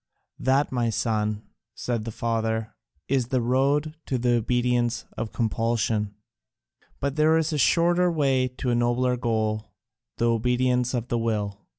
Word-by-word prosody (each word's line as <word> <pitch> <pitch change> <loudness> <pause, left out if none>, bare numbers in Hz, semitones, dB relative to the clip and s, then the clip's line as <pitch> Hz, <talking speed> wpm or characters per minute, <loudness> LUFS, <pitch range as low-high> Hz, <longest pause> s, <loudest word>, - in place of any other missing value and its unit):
"That, 135 +2 +2
my 120 -2 0
son," 110 -1 -1 0.3
said 115 -3 -3
the 115 - -4
father, 110 -1 -2 0.3
"is 130 -3 +1
the 130 0 +1
road 140 +5 +1
to 130 - 0
the 120 0 +1
obedience 120 0 +1
of 110 -1 -4
compulsion. 110 -2 0 0.8
But 140 +1 -2
there 155 +1 +4
is 160 0 0
a 150 - 0
shorter 175 +3 +3
way 135 -5 +2
to 125 0 -3
a - - +2
nobler 120 +1 +1
goal, 110 -3 -2 0.4
the 120 - +1
obedience 125 +2 +1
of 120 0 -3
the 120 - 0
will. 105 -3 -2
120 Hz, 150 wpm, -25 LUFS, 115-130 Hz, 0.8 s, there